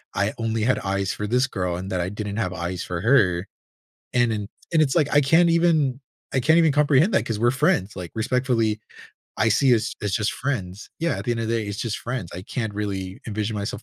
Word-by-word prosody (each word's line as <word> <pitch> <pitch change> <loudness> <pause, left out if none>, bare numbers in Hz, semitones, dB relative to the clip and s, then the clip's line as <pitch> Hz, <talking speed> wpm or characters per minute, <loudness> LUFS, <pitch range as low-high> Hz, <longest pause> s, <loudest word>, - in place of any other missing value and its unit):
I 100 +3 0
only 115 -1 -1
had 125 +2 +2
eyes 100 0 -1
for 105 - -4
this 125 +4 +2
girl 90 -8 -2
and 95 +2 -6
that 90 -1 0
I 90 - -2
didn't 105 0 -5
have 95 -5 -1
eyes 85 +1 -4
for 85 -1 -4
her 100 -7 +3 0.7
and 120 -2 +3
and 105 -1 -4 0.2
and 160 - +5
it's 140 0 +1
like, 150 -4 +2
I 145 - +6
can't 165 +5 +4
even 160 -6 +2 0.3
I 130 - +2
can't 160 +6 +4
even 160 -3 +5
comprehend 150 +6 +3
that - - +2
'cause 110 -3 -3
we're 120 +2 +3
friends, 135 - +1
like, 90 -3 -7
respectfully, 115 -2 0 0.6
I 110 - +2
see 125 +2 +4
us 110 +1 -1
as 100 -2 -1
just 105 0 0
friends. 105 -8 -4
Yeah, 165 -8 0
at 100 - -6
the - - 0
end 115 - -2
of 115 - -2
day, 115 -2 0
it's 100 0 -5
just 115 -3 -2
friends. 120 -8 -4
I 90 - -6
can't 110 -2 -4
really 95 -2 -4
envision 110 0 -2
myself 100 +2 -4
110 Hz, 230 wpm, -23 LUFS, 100-135 Hz, 0.7 s, I